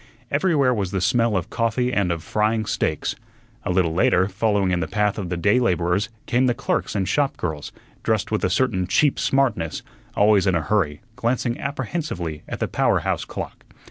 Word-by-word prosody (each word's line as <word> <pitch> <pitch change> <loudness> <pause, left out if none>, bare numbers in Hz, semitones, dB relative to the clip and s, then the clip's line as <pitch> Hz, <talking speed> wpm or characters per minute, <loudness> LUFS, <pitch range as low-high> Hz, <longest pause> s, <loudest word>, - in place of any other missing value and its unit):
Everywhere 145 -4 +3
was 100 -5 -1
the 95 - -1
smell 115 +2 +2
of 90 - -4
coffee 125 +2 0
and 100 -4 +1
of 85 -2 -3
frying 110 +2 0
steaks. - - -1 0.5
A - - -3
little 90 -3 +2
later, 90 +2 +3
following 100 -1 +1
in 90 - +1
the 80 - -2
path 105 +2 0
of 95 -4 -4
the 90 - -2
day 100 +7 +3
laborers, 90 -2 +1 0.2
came 125 +2 +2
the 120 - +1
clerks - - -1
and 95 -2 0
shop 145 -2 +1
girls, 80 -4 -4 0.3
dressed - - 0
with - - 0
a - - +2
certain 95 -1 +1
cheap 135 +10 +2
smartness, 120 - 0 0.3
always 105 -1 +4
in 95 - +3
a 85 - +1
hurry, 80 -5 0
glancing 120 0 -1
apprehensively 130 - -3
at - - -4
the - - 0
power - - +1
house - - -1
clock. - - -7
105 Hz, 190 wpm, -23 LUFS, 90-120 Hz, 0.5 s, always